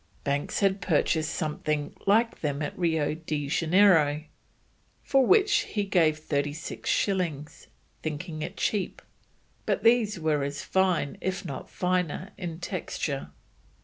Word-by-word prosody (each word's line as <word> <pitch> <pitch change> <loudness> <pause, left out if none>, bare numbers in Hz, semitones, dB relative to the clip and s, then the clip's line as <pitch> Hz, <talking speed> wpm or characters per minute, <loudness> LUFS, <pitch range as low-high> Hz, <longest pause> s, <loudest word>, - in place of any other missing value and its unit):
Banks 140 +6 -1
had 195 0 +2
purchased 160 -1 +1
something 150 -2 -2
like 225 +4 +3
them 145 -1 -1
at - - -4
Rio 160 -4 +1
de 155 -2 -3
Janeiro, 165 -2 +4 0.8
for 270 -1 +3
which 410 +1 +5 0.2
he 205 - +2
gave 165 -6 +3
thirty 145 -2 -1
six 155 - -6
shillings, 170 -7 -1 0.3
thinking 155 +1 -4
it 175 +5 -5
cheap, 205 -3 -1 0.6
but - - 0
these 225 -4 +4
were 155 -2 +1
as 140 +1 -3
fine, 185 -7 +1
if 190 0 -2
not 135 - -6
finer, 180 0 -1
in 170 -3 -6
texture. 155 - -3
165 Hz, 130 wpm, -27 LUFS, 150-190 Hz, 0.8 s, which